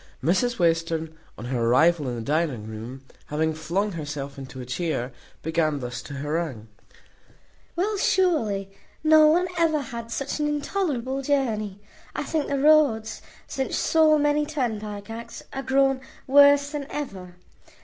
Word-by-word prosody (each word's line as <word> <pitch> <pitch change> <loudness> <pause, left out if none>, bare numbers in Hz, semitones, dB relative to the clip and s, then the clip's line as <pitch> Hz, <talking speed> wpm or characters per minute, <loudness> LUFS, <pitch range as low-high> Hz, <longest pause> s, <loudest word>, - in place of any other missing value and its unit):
Mrs 195 - +1
Western, 165 -2 0 0.2
on 110 - -7
her 125 -1 -1
arrival 145 +5 +3
in 120 - -3
the 115 - -4
dining 145 -5 -1
room, 115 +5 -8 0.2
having 160 +1 0
flung 175 +7 -1
herself 145 -4 -6
into 130 -1 -9
a 125 - -6
chair, 130 -1 -2 0.3
began 160 -2 0
thus 125 -1 -5
to 145 - -9
harangue: 145 -5 -3 1.1
"Well, 405 +5 0
surely, 225 - +1 0.3
no 310 0 +7
one 345 +4 +4
ever 320 -2 +3
had 235 -4 -6
such 275 +5 -3
an 295 - +1
intolerable 285 -4 -1
journey. 220 -8 -1 0.3
I - - -2
think 310 -3 -1
the 280 - -1
roads, 275 -7 +3 0.2
since 265 -1 -2
so 315 -1 +4
many 295 0 +2
turnpike 220 -8 -3
acts, 230 +1 -8
are 270 - -3
grown 270 0 +2 0.2
worse 285 +1 +6
than 290 -2 -4
ever. 190 -11 -6
210 Hz, 145 wpm, -25 LUFS, -, 1.1 s, no